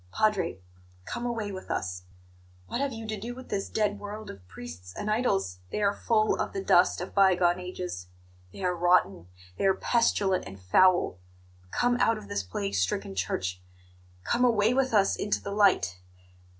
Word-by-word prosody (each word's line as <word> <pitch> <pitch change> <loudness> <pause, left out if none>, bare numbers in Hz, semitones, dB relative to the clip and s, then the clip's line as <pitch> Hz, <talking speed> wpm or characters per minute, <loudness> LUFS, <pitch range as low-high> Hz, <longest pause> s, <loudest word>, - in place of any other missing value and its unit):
"Padre, 195 - +1 0.5
come 240 0 -4
away 225 -4 -3
with 185 -1 -8
us! 90 -1 -3 0.6
What 240 - -3
have 280 -1 0
you 225 -1 -7
to 215 -1 -4
do 240 +4 -6
with 260 0 -11
this 195 -1 -2
dead 205 -1 0
world 210 +1 -7
of 95 -2 -15
priests 90 +1 -10
and 210 - -2
idols? 195 - 0
They - - -3
are 200 0 +3
full 215 0 +1
of - - -3
the 195 - -3
dust 175 -1 +4
of 180 - -6
bygone 185 -3 +4
ages; 180 - -6 0.4
they 190 - -9
are 180 -1 +1
rotten; 175 - +2 0.3
they - - +1
are 190 - +4
pestilent 200 -4 +1
and 95 0 -10
foul! 175 - +3 0.5
Come 245 - +1
out 225 -2 +3
of 215 - -11
this 100 - -1
plague 100 +1 -4
stricken 95 0 -1
Church 95 -1 -2 0.6
come 240 - +1
away 225 -2 +4
with 260 0 +1
us 200 -3 +3
into 205 - -1
the 200 - -6
light! 195 - +3
195 Hz, 175 wpm, -28 LUFS, -, 0.6 s, dust